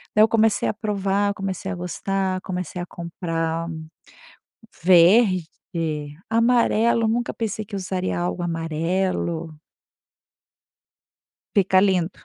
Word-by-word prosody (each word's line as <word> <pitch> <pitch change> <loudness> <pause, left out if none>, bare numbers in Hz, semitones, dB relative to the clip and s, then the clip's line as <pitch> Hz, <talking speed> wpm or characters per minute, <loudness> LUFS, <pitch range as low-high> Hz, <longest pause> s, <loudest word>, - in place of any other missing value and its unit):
Daí 215 - +6
eu - - +6
comecei 225 -1 +2
a - - -1
provar, 200 -1 0
comecei 195 -1 -4
a - - -3
gostar, 185 +1 -2
comecei 180 -2 -5
a 175 - -4
comprar 165 -1 -3 1.2
verde, 185 +1 +5 0.8
amarelo, 230 0 +3
nunca 240 +2 0
pensei 215 -1 -3
que 205 0 -8
usaria 185 -1 -2
algo 175 +1 -2
amarelo. 165 -1 -2 1.9
Fica 190 -2 +4
lindo. 185 -3 +2
190 Hz, 105 wpm, -23 LUFS, 175-210 Hz, 1.9 s, Daí